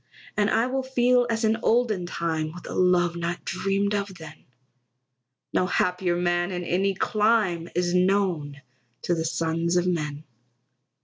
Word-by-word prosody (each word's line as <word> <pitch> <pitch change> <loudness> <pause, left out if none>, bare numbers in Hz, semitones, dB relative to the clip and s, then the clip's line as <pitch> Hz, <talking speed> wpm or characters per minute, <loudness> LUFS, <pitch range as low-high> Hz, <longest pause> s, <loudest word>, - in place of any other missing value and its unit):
And 210 0 +2
I 230 - +2
will 265 +1 -1
feel 250 -1 +2
as 225 0 -1
in 220 +1 +2
olden 220 -6 +1
time, 160 -2 -2
With 175 - -10
a - - -6
love 180 -1 +2
not 170 +1 -4
dreamed 195 +3 0
of 200 -2 -2
then; 160 -2 -12 1.1
No 185 - +2
happier 180 -1 0
man 175 +1 0
in 180 -1 -3
any 190 +3 0
clime 210 -5 +1
Is 175 0 0
known 180 -7 +1 0.4
to 175 - +1
the 165 -1 -1
sons 165 +1 -1
of 175 - +2
men. 150 -4 -2
180 Hz, 150 wpm, -25 LUFS, 170-205 Hz, 1.1 s, And